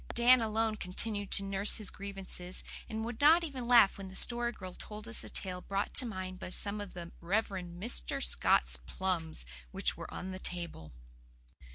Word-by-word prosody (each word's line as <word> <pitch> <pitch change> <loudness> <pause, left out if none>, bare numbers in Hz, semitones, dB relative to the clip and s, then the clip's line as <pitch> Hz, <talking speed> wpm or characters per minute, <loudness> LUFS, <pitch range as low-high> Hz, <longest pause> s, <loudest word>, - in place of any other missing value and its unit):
Dan 245 +1 +5
alone 220 0 -1
continued 205 +2 0
to 200 - +4
nurse 195 +1 +4
his 215 -3 -3
grievances, 195 -2 -4 0.3
and 220 0 -4
would 235 +1 -7
not 320 +4 +6
even 265 -7 -5
laugh 235 -5 +5
when 195 - -7
the 190 - -11
Story 240 +2 +5
Girl 185 -5 -10
told 210 +3 -9
us 230 - +1
a - - -6
tale 180 -2 -3
brought 195 +2 -3
to 255 - +4
mind 185 -3 -6
by 190 - -7
some 205 +3 +1
of 205 -2 -9
the 170 -1 -8
"Rev. 200 +6 0
Mr. 175 - -1
Scott's - - +2
plums" 170 - -3 0.2
which - - +1
were - - -9
on 190 - -6
the 185 - -7
table. 170 - -6
195 Hz, 185 wpm, -32 LUFS, 180-225 Hz, 0.3 s, not